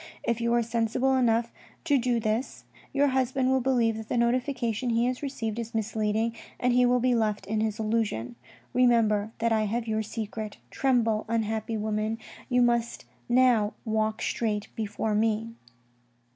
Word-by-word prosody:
If 235 0 -1
you 235 0 +1
are 240 - +3
sensible 235 +3 +1
enough 235 -2 +2 0.3
to 290 -4 +3
do 240 -1 +1
this, 220 +3 -2 0.3
your 285 0 +3
husband 260 0 +1
will 265 0 +3
believe 235 -3 +2
that 220 -1 -8
the - - 0
notification 245 -1 0
he 230 +1 +2
has 250 0 -1
received 235 -6 -3
is 230 0 -6
misleading, 220 +1 0 0.2
and 250 0 +2
he 250 0 +4
will 250 0 +3
be 250 +1 +2
left 215 -3 0
in 215 +2 -1
his 220 -1 -1
illusion. 215 - -1 0.4
Remember 225 -4 +3
that 230 0 0
I 220 -1 +2
have 230 +2 -2
your 220 0 0
secret; 215 -1 -5
tremble, 230 -5 +1
unhappy 220 0 -1
woman, 215 +1 -1 0.3
you 250 -1 +4
must 235 -1 0 0.2
now 240 -4 +4
walk 220 0 0
straight 210 -3 -1
before 215 0 -2
me.' 225 +1 0
230 Hz, 160 wpm, -27 LUFS, 215-245 Hz, 0.4 s, he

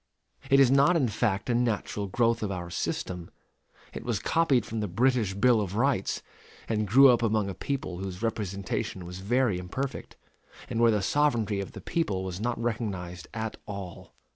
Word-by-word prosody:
_ - - -12
It 135 - +7
is 135 -2 +6
not 140 +6 +5
in 140 -7 +3
fact 105 -2 -1
a 125 - +1
natural 110 -4 -1
growth 115 +3 +1
of 105 - -1
our 90 -2 -5
system. 90 -1 -3 0.6
It - - -6
was - - -1
copied 145 -8 +2
from 110 - -4
the 105 - -1
British 115 0 +1
Bill 115 +2 +4
of 100 -1 -4
Rights, 120 -4 0 0.4
and 110 -2 0
grew 135 +7 +8
up 120 -2 +4
among 110 -3 +1
a - - -6
people 110 -7 -4
whose 95 +1 -6
representation 100 -2 -3
was 90 +1 -7
very 110 -1 +1
imperfect, 130 +10 -5 0.6
and 115 - -1
where 115 0 +6
the 105 -3 +1
sovereignty 115 -9 +1
of 100 - -5
the - - -9
people 100 - -1
was 95 -1 -5
not 120 +1 -1
recognized 100 -7 -3
at 110 -1 -4
all. 100 -4 -8
110 Hz, 185 wpm, -28 LUFS, 95-120 Hz, 0.6 s, grew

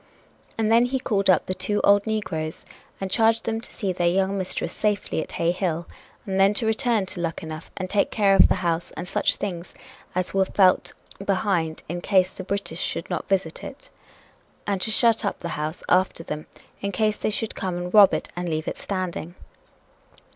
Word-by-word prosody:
And 220 -1 +1
then 235 +2 +6
he 265 +2 -1
called 200 -6 0
up 185 - +4
the 185 - -2
two 185 +3 -1
old 200 +1 +5
negroes 185 -8 -3 0.3
and 195 -1 -4
charged 225 +1 +3
them 225 0 -1
to - - -6
see 195 -3 -2
their 175 -1 +1
young 190 +2 +1
mistress 185 -2 -3
safely 205 -6 -1
at - - -8
Hay 170 0 +1
Hill 175 -2 -2 0.4
and 195 -1 -1
then 195 +2 +5
to 225 - 0
return 220 -1 +1
to 185 0 -6
Luckenough 160 -1 -5
and 185 - -3
take 200 +2 +1
care 200 -3 +3
of - - +8
the - - +2
house 170 0 0
and 175 - -5
such - - +2
things 175 -3 -5 0.4
as 185 0 0
were 195 0 +4
felt 190 -1 +3 0.3
behind 185 -5 0
in 175 +2 -4
case 190 -1 +3
the 185 - -8
British 200 -3 -3
should 165 - -3
not - - -3
visit 185 -5 -1
it, - - -10 0.7
and 200 -2 -1
to - - 0
shut 225 0 +3
up - - -1
the 170 - -4
house 155 +1 -4
after 185 -2 +2
them 155 -1 -6 0.3
in 200 - -2
case 215 +2 +1
they - - -1
should 220 +1 -2
come 185 -2 -3
and 180 0 -5
rob 205 -2 +8
it - - -2
and 175 0 -3
leave 155 0 -2
it - - -4
standing. 180 -3 -4
190 Hz, 200 wpm, -24 LUFS, 175-205 Hz, 0.7 s, of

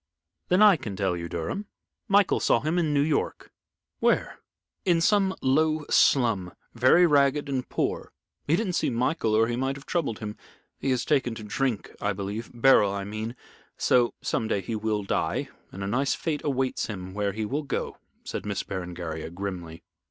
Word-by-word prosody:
"Then 185 +3 +4
I 205 -5 +7
can 105 -8 -6
tell 95 -2 0
you, 85 0 -5
Durham. 85 - -4 0.4
Michael 200 -2 +4
saw 115 - +3
him 160 +4 0
in 160 -3 +1
New 145 -1 +3
York." 150 -1 -1 0.5
"Where?" - - +1 0.4
"In 175 -3 +3
some 195 +1 +3
low 155 +3 +2
slum, 110 -9 +3 0.2
very 130 +9 +5
ragged 145 -2 +3
and 130 -2 -3
poor. - - -2 0.4
He 155 - +4
didn't 195 -2 -1
see - - +1
Michael, 125 -1 0
or 110 +1 +5
he 120 - -1
might 135 +2 -1
have 140 - -11
troubled 150 -11 -1
him. 105 -1 -6 0.4
He 135 - -2
has 125 -2 +1
taken 130 -6 +1
to 110 - -8
drink, 115 +1 -2
I 105 0 0
believe 100 +4 -5
Beryl 120 -4 +5
I 100 0 -3
mean 110 +4 -5 0.4
so 120 -1 +3
some 110 - -1
day 100 -3 0
he 110 +5 -4
will 110 -1 -1
die, 100 - -1 0.2
and 95 - -6
a - - -3
nice 130 +6 +1
fate 155 -3 -2
awaits 135 -2 -1
him 95 -4 -6
where 100 -1 -1
he 110 +1 -3
will 140 +8 -2
go," 140 -3 -4 0.2
said - - -5
Miss 100 -2 -2
Berengaria, 85 -4 -5
grimly. 85 -2 -6
120 Hz, 180 wpm, -26 LUFS, 100-145 Hz, 0.5 s, I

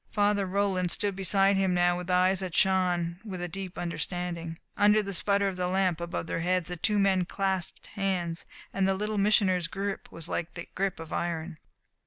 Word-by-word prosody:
Father 205 -2 +2
Roland 190 -2 +1
stood 200 +2 -1
beside 195 +1 +3
him 190 -2 +2
now 175 0 +3
with 180 +1 -6
eyes 185 +1 +3
that 185 -3 -4
shone 180 -3 +2
with 195 -5 -6
a 175 - -3
deep 185 +1 -7
understanding. 170 -1 -4 0.2
Under 210 +1 +4
the 200 0 -4
sputter 200 +2 +2
of 190 -2 -3
the 180 0 0
lamp 185 -2 +1
above 170 -1 -3
their 165 - -2
heads 180 0 0
the 180 - -3
two 210 +5 0
men 195 -2 +3
clasped 190 -1 -2
hands, 180 -4 -2 0.3
and 195 -1 +2
the 195 - +2
Little 210 +1 -2
Missioner's 195 -4 +3
grip 195 +3 -4
was 165 -1 -8
like 170 -1 -3
the 170 - -6
grip 195 -3 -1
of 160 -1 -7
iron. 165 -1 -3
185 Hz, 195 wpm, -28 LUFS, 175-195 Hz, 0.3 s, Under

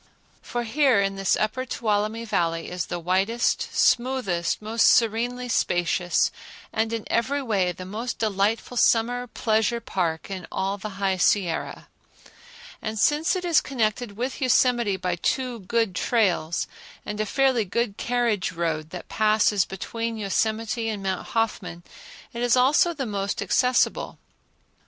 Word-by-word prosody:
For 240 0 -3
here 255 -1 +3
in 195 0 0
this 195 -1 +1
upper 215 +4 -1
Tuolumne 220 -2 -1
Valley 165 -6 -1
is 180 -2 -3
the 175 - -3
widest, 190 +7 0
smoothest, 240 -9 +1
most 220 +2 +2
serenely 240 +2 +2
spacious, 175 -5 +1 0.4
and 220 0 0
in 225 -2 -3
every 275 +5 0
way 195 -7 +1
the 185 +1 -9
most 225 +6 -4
delightful 215 +3 0
summer 245 +2 +2
pleasure 225 0 0
park 175 -5 -2
in 185 -2 -6
all 195 +1 -2
the 200 0 -7
High 195 -1 0
Sierra. 180 -2 0 0.9
And 220 0 -4
since 300 - +2
it 365 -1 -3
is 335 -3 +4
connected 220 -4 -2
with 255 +4 -3
Yosemite 240 -5 +3
by 180 -1 -2
two 250 +5 -1
good 225 +1 0
trails, 185 -6 +1 0.4
and 210 0 -3
a - - 0
fairly 265 -1 +2
good 210 +1 -2
carriage 235 -5 0
road 160 -2 -2
that 180 +1 -8
passes 215 -3 +2
between 230 +4 -4
Yosemite 220 +2 -1
and 205 -3 -4
Mount 190 -1 -2
Hoffman, 195 -6 -2 0.5
it 235 - -5
is 245 0 +3
also 295 +7 +4
the 275 -3 -3
most 200 -2 -3
accessible. 250 +6 +1
220 Hz, 140 wpm, -25 LUFS, 190-240 Hz, 0.9 s, is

